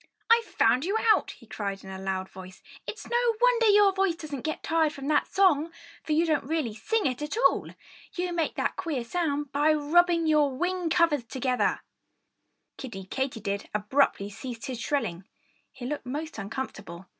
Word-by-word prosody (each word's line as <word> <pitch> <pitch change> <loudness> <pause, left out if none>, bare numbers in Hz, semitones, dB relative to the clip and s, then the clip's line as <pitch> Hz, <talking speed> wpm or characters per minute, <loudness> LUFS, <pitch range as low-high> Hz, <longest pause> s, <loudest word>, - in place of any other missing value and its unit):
"I've 465 0 +5
found 250 - +2
you 395 +6 0 0.2
out!" - - -1
he 230 - -12
cried 200 -3 -5
in 190 - -9
a 190 0 -7
loud 190 -1 -2
voice. 185 0 -12 0.2
"It's 430 - -7
no 475 -1 +2
wonder 485 -2 +4
your 410 -1 +6
voice 380 -3 +1
doesn't 295 -5 -6
get 310 +3 -4
tired 320 -2 +1
from 275 -1 -7
that 300 - +2
song! 335 -5 +3 0.3
For 310 - -2
you 325 +3 +3
don't 310 -3 +1
really 295 -6 -2
sing 430 - -1
it 255 0 -1
at 300 +8 -3
all! 475 - +3 0.5
You 355 0 -2
make 330 -2 -1
that - - -1
queer 300 -9 -2
sound 290 0 -2
by 295 +2 +3
rubbing 335 +3 +3
your 300 -2 +4
wing 360 +1 -1
covers 315 -6 +2
together!" 255 0 0 1.0
Kiddie 205 -8 -7
Katydid 225 -7 -3
abruptly 210 -1 +1
ceased 235 +3 -7
his 255 -4 -5
shrilling. 205 - -2 0.4
He 250 - -9
looked 290 -1 -4
most 300 0 -5
uncomfortable. 200 -5 -6
290 Hz, 175 wpm, -27 LUFS, 230-340 Hz, 1.0 s, your